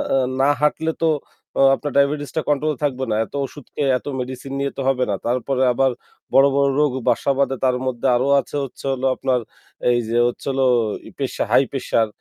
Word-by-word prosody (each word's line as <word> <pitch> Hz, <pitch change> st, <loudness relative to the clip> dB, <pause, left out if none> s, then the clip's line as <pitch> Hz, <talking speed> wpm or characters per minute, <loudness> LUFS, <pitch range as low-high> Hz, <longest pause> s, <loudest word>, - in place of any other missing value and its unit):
আ -, -, +4 dB, 0.2 s
না 140 Hz, -, +4 dB
হাঁটলে 160 Hz, +2 st, +1 dB
তো 165 Hz, -, +3 dB, 0.7 s
আপনার 145 Hz, 0 st, -5 dB
ডায়াবেটিসটা 145 Hz, +2 st, +1 dB
কন্ট্রোল 150 Hz, +1 st, +1 dB
এ -, -, -20 dB
থাকবে 135 Hz, -2 st, -1 dB
না। -, -, +2 dB
এত -, -, -23 dB
ওষুধ 145 Hz, 0 st, -11 dB
খেয়ে 140 Hz, -2 st, 0 dB
এত -, -, -14 dB
মেডিসিন 130 Hz, +2 st, -6 dB
নিয়ে 140 Hz, 0 st, -1 dB
তো -, -, -2 dB
হবে 130 Hz, -1 st, +2 dB
না। 100 Hz, -, +1 dB
তারপরে 125 Hz, +2 st, 0 dB
আবার 135 Hz, +1 st, +2 dB, 0.4 s
বড়, 135 Hz, +1 st, +7 dB
বড় 140 Hz, 0 st, +3 dB
রোগ 150 Hz, -3 st, +3 dB, 0.2 s
বাসা 120 Hz, +3 st, +1 dB
বাধে 135 Hz, -1 st, +1 dB
তার 125 Hz, -1 st, +2 dB
মধ্যে 125 Hz, -2 st, -1 dB
আরো 130 Hz, +3 st, +1 dB
আছে 145 Hz, -, -6 dB
হচ্ছে 135 Hz, +1 st, -9 dB
হলো 135 Hz, 0 st, -2 dB
আপনার 130 Hz, -2 st, 0 dB, 0.5 s
এই 120 Hz, -, +2 dB
যে 120 Hz, -, 0 dB
হচ্ছে 120 Hz, -, -5 dB
হলো 135 Hz, 0 st, +1 dB, 0.4 s
এই -, -, -12 dB
প্রেশা -, -, -2 dB
হাই -, -, +6 dB
প্রেশার 115 Hz, -1 st, 0 dB
135 Hz, 200 wpm, -21 LUFS, 125-140 Hz, 0.7 s, বড়